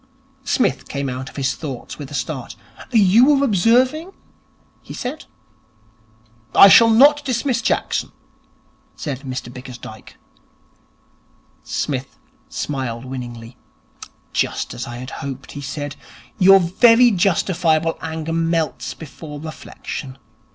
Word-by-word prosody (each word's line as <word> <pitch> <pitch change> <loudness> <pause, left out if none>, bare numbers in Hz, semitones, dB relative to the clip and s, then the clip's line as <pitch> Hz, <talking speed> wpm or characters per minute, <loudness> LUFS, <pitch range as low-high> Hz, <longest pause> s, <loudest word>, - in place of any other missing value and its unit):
Psmith - - 0
came 140 -1 -3
out 130 +1 -5
of - - -18
his 135 -1 0
thoughts 140 -3 -7
with 140 -2 -7
a 145 - -7
start. 135 -3 -4 0.4
'You 220 +1 +5
were 280 0 +2
observing 255 - +2 0.4
?' - - -37
he - - -10
said. 265 +5 -5 1.3
'I 195 - +10
shall 230 +3 +8
not 285 +6 +6
dismiss 255 -2 -1
Jackson,' - - -1 0.8
said 140 -5 -5
Mr 130 -3 -6
Bickersdyke. 125 -4 -11 1.4
Psmith 135 -2 -4 0.3
smiled 130 -4 -4
winningly. 120 -2 -8 0.8
'Just - - -1
as 120 - -6
I 120 - -7
had 130 +2 -8
hoped,' 135 -1 -7
he 145 - -7
said. 145 +1 -5 0.4
'Your 195 +1 +8
very 230 +7 +5
justifiable 165 -4 +1
anger 160 0 -4
melts 165 -4 -1
before 150 -1 -9
reflection. 145 -3 -8
155 Hz, 115 wpm, -20 LUFS, 130-210 Hz, 1.4 s, I